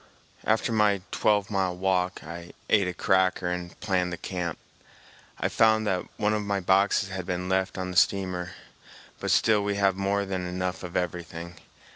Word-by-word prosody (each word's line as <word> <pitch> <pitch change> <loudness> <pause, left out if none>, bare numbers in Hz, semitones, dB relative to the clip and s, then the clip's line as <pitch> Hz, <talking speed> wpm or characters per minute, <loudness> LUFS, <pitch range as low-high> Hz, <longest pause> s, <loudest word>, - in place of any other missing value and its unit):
After 110 +2 +2
my 105 -3 +3
twelve 105 -1 +2
mile 95 -3 0
walk, 90 -3 0
I 85 +2 -9 0.2
ate 100 -4 +4
a 90 - -2
cracker 95 -3 +2
and 90 -1 -5
planned 90 -2 0
the 85 - -4
camp. 90 -3 -4 0.8
I - - +1
found 110 -1 +3
that 95 -3 0
one 105 +1 +1
of 105 - 0
my 100 -1 -1
boxes 95 +2 +3
had 95 -2 -5
been 90 0 -2
left 95 +1 0
on 95 0 -3
the 90 - -3
steamer, 90 -2 +1 0.7
but - - -3
still 105 -2 +4
we 100 0 -1
have 100 -1 +2
more 100 +1 0
than 95 -2 -3
enough 90 0 -3
of 90 -1 -4
everything. 85 0 -4
95 Hz, 175 wpm, -27 LUFS, 90-100 Hz, 0.8 s, ate